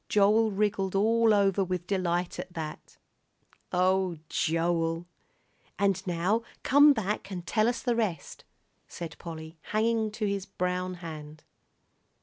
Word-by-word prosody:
Joel 210 +2 +4
wriggled 195 -1 0
all 225 +3 +4
over 200 -1 +3
with 180 -1 -3
delight 180 -2 -1
at 180 0 -7
that 155 -2 -7 0.7
"Oh, 185 -1 +2
Joel!" 165 0 0 0.7
"And 195 -2 +1
now 180 +6 +1 0.2
come 290 +2 +7
back 210 -5 -2
and 180 -3 -6
tell 215 +4 +2
us 240 - -1
the 245 -2 +1
rest," 215 -8 -3 0.4
said 165 -2 -7
Polly, 160 -1 -8
hanging 220 +1 0
to 215 0 -2
his 200 -1 -2
brown 180 0 -2
hand. 155 -1 -8
190 Hz, 130 wpm, -28 LUFS, 175-215 Hz, 0.7 s, come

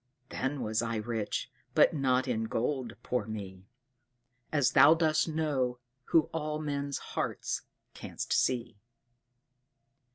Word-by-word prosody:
Then 135 +1 -2
was 110 +1 0
I 115 -1 -2
rich, 110 -1 -3 0.2
but - - +6
not 130 -3 +1
in 115 -3 0
gold, 120 +1 -2
poor 125 -4 -1
me! 100 -3 -7 0.8
As 145 -4 +3
Thou 155 +3 +8
dost 160 -1 +2
know, 145 -6 0 0.3
who 165 - +5
all 155 -1 -2
men's 140 -2 -2 0.2
hearts - - -2 0.3
canst - - -4
see. 120 -5 0
130 Hz, 120 wpm, -30 LUFS, 115-150 Hz, 0.8 s, Thou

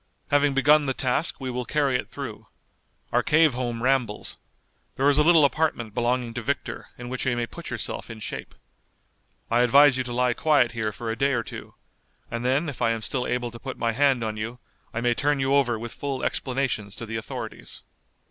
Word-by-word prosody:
Having 145 -1 +3
begun 145 +2 +5
the 130 - 0
task 130 +6 0
we 130 -2 -3
will 125 0 -2
carry 140 +1 +1
it 125 - -2
through. - - -7 0.6
Our - - +3
cave 155 -2 +4
home 120 -2 -3
rambles. 125 -5 0 0.6
There 135 - +2
is 145 - +3
a - - +6
little 165 -2 +6
apartment 140 -7 0
belonging 120 -1 0
to 120 - -4
Victor, 140 +4 -3
in 120 - -8
which 130 +1 -3
you 120 -2 +1
may 120 - 0
put 115 - -9
yourself - - -3
in 115 -1 -8
shape. - - -6 1.0
I 120 - +4
advise 135 +2 +6
you 130 - 0
to 120 - -5
lie 125 0 +2
quiet 145 -5 +3
here 110 -2 -2
for 115 +2 -4
a - - -2
day 140 +3 +1
or 120 -2 0
two, - - -9 0.6
and 115 0 -3
then 135 +6 +1
if 140 -5 -6
I 115 - +3
am 115 -1 -1
still 125 +2 -2
able 125 -1 -1
to 115 - -10
put 130 +1 -6
my 115 -1 0
hand 135 -1 +2
on 110 -1 -3
you 115 +3 -4 0.3
I 115 - -3
may 120 0 +3
turn 145 +3 +1
you 135 +1 +1
over 130 -5 +3
with 115 +1 -6
full 140 -2 -4
explanations 125 -7 -1
to 115 - -6
the 115 0 -4
authorities." 110 - -6
125 Hz, 215 wpm, -25 LUFS, 115-140 Hz, 1.0 s, a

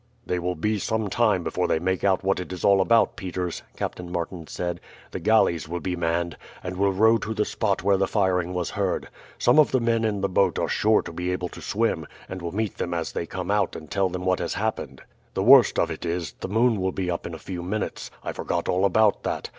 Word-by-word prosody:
"They 90 - -1
will 90 +1 -2
be 105 +6 0
some 110 -1 -1
time 105 -6 +2
before - - -1
they - - +2
make 95 +3 -1
out 95 -1 +2
what 95 -1 +1
it 90 - -6
is 90 - -4
all 100 -1 +5
about, 115 +3 +3
Peters," 90 -2 -4 0.2
Captain 90 -1 -4
Martin 85 -1 -4
said. 85 -1 -4 0.3
"The - - -4
galleys 85 -5 +2
will 90 +1 -3
be 90 0 -2
manned, 85 0 -1 0.3
and 90 +1 -4
will 100 +1 +2
row 110 +4 +4
to 110 +1 -4
the 105 -1 +1
spot 100 -5 -1
where 100 0 +4
the 95 0 +1
firing 90 -4 +1
was 90 -1 -2
heard. - - -1 0.3
Some 125 +5 +4
of 150 - +6
the 130 - +2
men 115 -1 +1
in 105 -3 0
the 100 - +2
boat 95 -1 +2
are - - 0
sure 110 +1 +3
to - - -8
be 90 +2 -2
able 90 -1 -2
to - - -11
swim, - - -1 0.2
and 95 -1 -6
will 85 -1 -4
meet 110 +1 -3
them 85 0 -2
as 85 -1 -2
they 85 - -4
come 90 +2 -4
out 105 -2 +1
and 80 - -9
tell 100 -2 +1
them 90 0 -5
what 95 -1 +2
has - - -2
happened. - - -3 0.3
The 95 - 0
worst 130 +2 +7
of - - +1
it - - -6
is, 85 -2 -2
the - - -4
moon 110 +1 +2
will 95 0 0
be 90 -1 -2
up 85 - -3
in 85 - -6
a - - -7
few 90 +2 -6
minutes. 95 +4 -3
I - - -3
forgot 85 -1 -2
all 95 +2 +2
about 105 +2 +3
that. - - -3
95 Hz, 250 wpm, -25 LUFS, 90-105 Hz, 0.3 s, worst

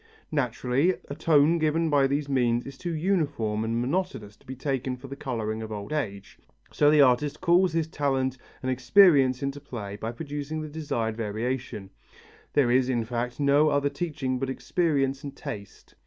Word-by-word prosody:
Naturally, 135 +4 +1
a - - -3
tone 155 +1 +3
given 160 +1 +1
by 140 -2 +4
these 140 +1 -1
means 120 -3 +1
is 135 - -8
too 170 +3 -4
uniform 150 - 0
and 115 +1 -1
monotonous 130 - -2
to - - -27
be 130 - -6
taken 130 -1 -2
for 135 +2 -10
the 135 - -7
colouring 110 -6 -3
of 110 0 -7
old 105 +6 -5
age, 100 -10 -4 0.3
so 145 - +4
the 150 -1 +6
artist 135 +3 +2
calls 180 0 +3
his 165 -1 +1
talent 135 -4 -1 0.3
and 130 - 0
experience 130 0 +5
into 140 +1 -3
play 105 -8 -7
to 110 +2 -4
produce 145 +3 -6
the 155 0 -3
desired 130 -8 -2
variation; 115 -1 -4 0.6
there 135 -5 +3
is, 130 +1 +3
in 120 -3 0
fact, 120 +2 -3
no 145 +2 +4
other 145 -1 +1
teaching 140 -4 -3
but 135 0 -2
experience 135 -2 0
and 140 -1 -7
taste. 100 -1 -8
135 Hz, 175 wpm, -27 LUFS, 120-150 Hz, 0.6 s, the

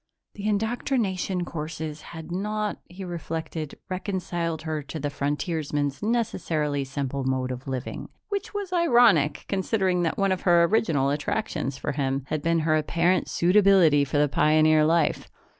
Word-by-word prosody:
The 205 0 -5
indoctrination 210 -4 -1
courses 155 -1 -5
had 160 0 -9
not, 210 +3 -2
he 185 +2 -8
reflected, 165 -3 -5
reconciled 175 -4 -3
her 155 -2 -2
to 150 +2 -7
the 145 0 -2
frontiersman's 145 -1 -2
necessarily 165 -10 -1
simple 140 0 -3
mode 130 -1 -1
of 125 +2 -7
living 130 -1 -5 0.2
which 400 -1 -3
was 405 -3 -4
ironic, 240 - +4
considering 190 -2 0
that 165 -2 -1
one 195 -1 +2
of 185 - -1
her 175 -2 +5
original 165 -8 +2
attractions 145 -2 -2
for - - -3
him 135 -1 -1
had 155 - -1
been 165 +2 +1
her 155 0 +2
apparent 170 +3 +1
suitability 180 -5 +5
for 140 +1 -2
the 145 0 +4
pioneer 155 +2 +4
life. 165 -1 +1
165 Hz, 145 wpm, -25 LUFS, 145-190 Hz, 0.2 s, her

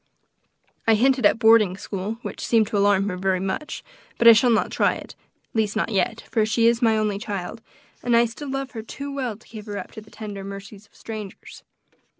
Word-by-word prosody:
I 225 - +6
hinted 255 0 +4
at - - +3
a - - -13
boarding 220 -4 +5
school, 200 +1 -4
which - - -6
seemed 225 -2 +3
to 210 - -1
alarm 200 -1 +3
her 180 - -4
very 190 0 0
much; 195 +11 -4 0.3
but 235 - +4
I 230 - +12
shall 230 +3 +4
not 225 -3 +2
try - - +2
it, - - -10 0.4
at - - -35
least 220 -1 0
not 220 - -1
yet, 220 +3 0
for 220 - +2
she 220 +2 +1
is 235 +1 +3
my 225 -2 +3
only 210 -2 0
child, 200 +1 -5 0.4
and 240 -1 +2
I 235 - +5
still 255 +5 -7
love 270 -1 -3
her 225 - -6
too 280 +5 -7
well 255 -6 -3
to 230 - -22
give 215 -1 -10
her 205 -1 -5
up 190 - -7
to 220 - -9
the 215 - -17
tender 205 -3 -7
mercies 200 +1 -9
of - - -33
strangers. 215 -3 -9
220 Hz, 225 wpm, -23 LUFS, 200-235 Hz, 0.4 s, I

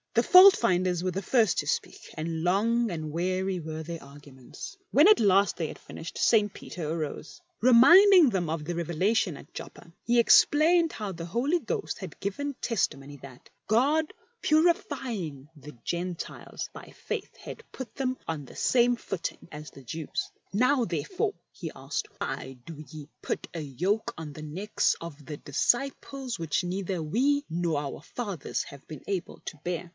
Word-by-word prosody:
The 235 - +3
fault 375 +5 +9
finders 180 -4 +1
were 185 - 0
the 195 - -3
first 220 -2 +2
to - - -3
speak, - - -3
and 160 +1 -3
long 225 +5 +2
and 155 -3 -4
weary 185 +3 -1
were 160 0 -5
their 165 +1 -6
arguments. 140 - -11
When 295 +6 +6
at 425 -1 +6
last 200 -2 +4
they 165 - -2
had - - -9
finished, 165 - -9
St. 210 -3 +3
Peter 165 -5 -7
arose. 160 - -5 0.2
Reminding 330 - +8
them 180 -5 -1
of 155 -1 -3
the 175 +2 -3
revelation 170 +1 0
at 140 - -15
Joppa, 165 - -10
he 240 0 +3
explained 320 +7 +5
how 210 -3 -5
the 165 -1 -6
Holy 265 - +1
Ghost 240 - -3
had 185 -5 -8
given 280 +9 -3
testimony 145 - -2
that, 130 -3 -13
" - - -50
God 285 +9 +2 0.3
purifying 270 - 0
the 150 -2 -12
Gentiles 175 0 -4
by - - -11 0.2
faith, - - -3
had - - -9
put 260 -2 -8
them 260 -2 -1
on 160 -3 -3
the 135 - -13
same 245 -1 +3
footing 195 -6 -5
as 150 -1 -9
the 135 - -14
Jews." 155 +5 -4
" - - -41
Now 250 +5 +3
therefore," 360 - -2 0.2
he - - -7
asked, 425 0 -4
" - - -29
why 130 0 -5
do 155 -2 -9
ye 155 -3 -9
put - - -3
a 165 - -4
yoke 180 - -1
on 155 -2 -7
the 155 - -9
necks 180 +8 0
of 155 -4 -9
the 150 -2 -6
disciples 260 - -1
which 165 +2 -1
neither 185 -1 -2
we 275 - +1
nor 165 -2 0
our 140 -1 -5
fathers 195 - -4
have 140 -1 -13
been 155 -4 -8
able 190 -3 -3
to - - -5
bear?" 175 0 -3
185 Hz, 175 wpm, -28 LUFS, 155-245 Hz, 0.3 s, fault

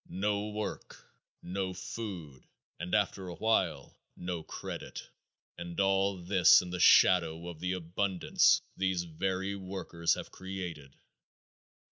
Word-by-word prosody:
No 105 +2 -1
work, 105 0 -5 0.5
no 95 0 -3
food, 90 - -7 0.3
and 85 +4 -1
after 100 -2 0
a 85 - -6
while, 110 +3 0 0.2
no 90 -2 -4
credit, - - -7 0.5
and 85 0 -6
all 95 0 +2
this 90 0 +6
in 90 -1 -5
the 90 - -3
shadow 85 -2 +5
of 85 -3 -8
the 90 +2 -1
abundance 90 +1 +2
these 95 -2 0
very 95 +4 -2
workers 95 -3 -1
have - - -8
created. 90 -7 -7
90 Hz, 120 wpm, -31 LUFS, 85-95 Hz, 0.5 s, this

